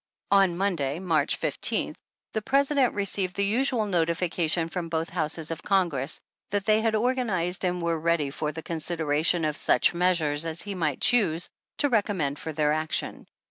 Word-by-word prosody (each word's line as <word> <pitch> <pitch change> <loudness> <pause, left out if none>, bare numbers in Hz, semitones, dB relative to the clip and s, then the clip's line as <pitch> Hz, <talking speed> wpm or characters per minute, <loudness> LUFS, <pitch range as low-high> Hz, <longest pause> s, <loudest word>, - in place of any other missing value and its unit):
On 195 -3 +4
Monday, 165 -8 -1
March 165 -5 0
15th, - - 0 0.4
the 220 - -1
President 275 +1 +2
received 195 -2 -1
the 200 - +1
usual 235 +1 +1
notification 170 -2 0
from 170 0 -5
both 165 0 -2
houses 160 -1 -1
of 165 - -5
Congress, 165 -8 0 0.3
that 205 -1 -2
they 215 0 +3
had 220 -1 +1
organized 215 -7 0
and 180 0 -1
were 165 -1 0
ready 160 -3 0
for 150 +2 -3
the 160 +1 -8
con 165 - -4
sideration 160 0 +1
of 150 - -2
such - - +3
measures 170 -4 +1
as 165 0 0
he 205 - -5
might 155 -7 -2
choose 180 -9 +3 0.3
to 290 - +3
recommend 195 - 0
for 160 - -5
their 150 -1 +1
action. 155 0 -2
175 Hz, 170 wpm, -26 LUFS, 160-200 Hz, 0.4 s, On